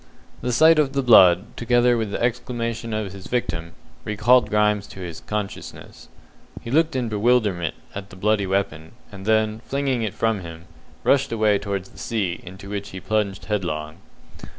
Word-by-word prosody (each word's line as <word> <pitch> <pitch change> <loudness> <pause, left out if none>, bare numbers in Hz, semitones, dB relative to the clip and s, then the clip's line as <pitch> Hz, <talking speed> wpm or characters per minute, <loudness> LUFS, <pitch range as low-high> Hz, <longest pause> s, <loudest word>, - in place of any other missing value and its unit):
The 125 - -1
sight 160 +6 +6
of 140 -3 +1
the 140 -1 0
blood, 95 -4 +6
together 120 0 +3
with 110 -2 -1
the - - -3
exclamation 115 -1 -2
of 110 -3 -3
his 95 -1 -10
victim, 85 -9 -2 0.3
recalled 110 +4 +3
Grimes 105 -1 +2
to 90 -3 -7
consciousness. 105 -2 -6 0.5
He 115 - -8
looked 160 +1 +2
in 125 -2 0
bewilderment 105 -6 +1 0.2
at 100 0 -7
the 95 - -12
bloody 100 +1 +1
weapon, 80 -5 -2 0.2
and 100 0 -10
then, 110 0 +2
flinging 135 -3 0
it 110 -3 -3
from 115 -2 0
him, 85 -2 -10 0.4
rushed 135 0 +3
away 105 -3 +2
towards 100 -2 -4
the - - -16
sea, 100 -7 -2
into 95 +2 -11
which 100 0 -5
he 95 - -7
plunged 100 0 -1
headlong. 80 -7 -3
105 Hz, 165 wpm, -23 LUFS, 95-120 Hz, 0.5 s, sight